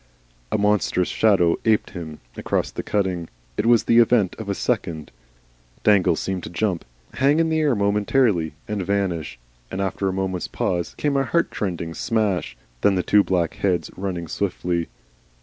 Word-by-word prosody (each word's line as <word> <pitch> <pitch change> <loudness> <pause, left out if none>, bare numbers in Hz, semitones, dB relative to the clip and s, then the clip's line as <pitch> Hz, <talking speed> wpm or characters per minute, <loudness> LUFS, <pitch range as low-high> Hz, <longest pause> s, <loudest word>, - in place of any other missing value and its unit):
A - - +2
monstrous 100 -3 +1
shadow 95 -6 +3
aped 110 -2 +2
him 80 -5 -8
across - - -1
the - - -4
cutting. 95 -5 -1 0.3
It 110 - 0
was 120 -2 +5
the 115 - +4
event 115 -5 +3
of 110 -2 -6
a 100 - 0
second. 80 -5 -2 0.7
Dangle 100 -3 +4
seemed 95 -1 -3
to - - -6
jump, 90 0 -1 0.3
hang 140 +4 +3
in 165 0 +2
the 160 0 +1
air 150 -5 +2
momentarily, 100 - +1
and 105 -1 -2
vanish, 90 -8 -1 0.3
and 95 - -5
after 95 0 -1
a - - -2
moment's 95 -1 -2
pause 85 -1 -2
came 145 -2 0
a 135 - +3
heart 170 +7 0
rending 85 -4 -2
smash. 100 - -1 0.2
Then 95 -2 +3
two 105 +3 +4
black 90 -4 0
heads 90 -3 0
running 90 -3 -4
swiftly. 90 -2 -2
95 Hz, 165 wpm, -23 LUFS, 85-110 Hz, 0.7 s, was